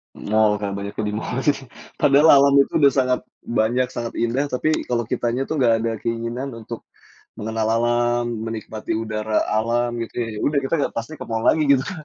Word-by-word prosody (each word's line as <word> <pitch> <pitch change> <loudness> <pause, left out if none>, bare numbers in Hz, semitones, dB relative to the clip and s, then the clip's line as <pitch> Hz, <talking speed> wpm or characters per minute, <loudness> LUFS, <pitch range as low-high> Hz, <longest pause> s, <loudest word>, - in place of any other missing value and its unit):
Mall, 105 -1 +1
Kak, 100 0 -3
banyak 100 0 -6
yang 110 - -3
di - - -5
mall 130 +1 -3
sih. 140 -2 0 0.3
Padahal 145 +1 +6
alam 140 0 +4
itu - - -1
udah 140 -3 +5
sangat 125 -1 +2 0.2
banyak, 120 +2 +1
sangat 120 -1 -5
indah. 125 +5 0
Tapi 155 +4 -1
kalau 120 -1 0
kitanya 120 +2 -1
tuh 155 +3 -3
enggak 120 -4 +4
ada 115 - 0
keinginan 115 +3 -4
untuk 115 0 -9 0.5
mengenal 110 0 -2
alam, 120 0 +1 0.2
menikmati 110 -1 -5
udara 110 -1 -1 0.2
alam 120 +2 +1
gitu - - -10
ya, 115 - -1
ya - - -6
sudah, 145 - +1
kita 135 - -3
sudah - - -2
pasti 115 +7 -4
ke - - -8
mall 115 0 -2
lagi 155 - +4
gitu, 140 - +5
Kak. 180 -6 -7
120 Hz, 200 wpm, -22 LUFS, 110-135 Hz, 0.5 s, Padahal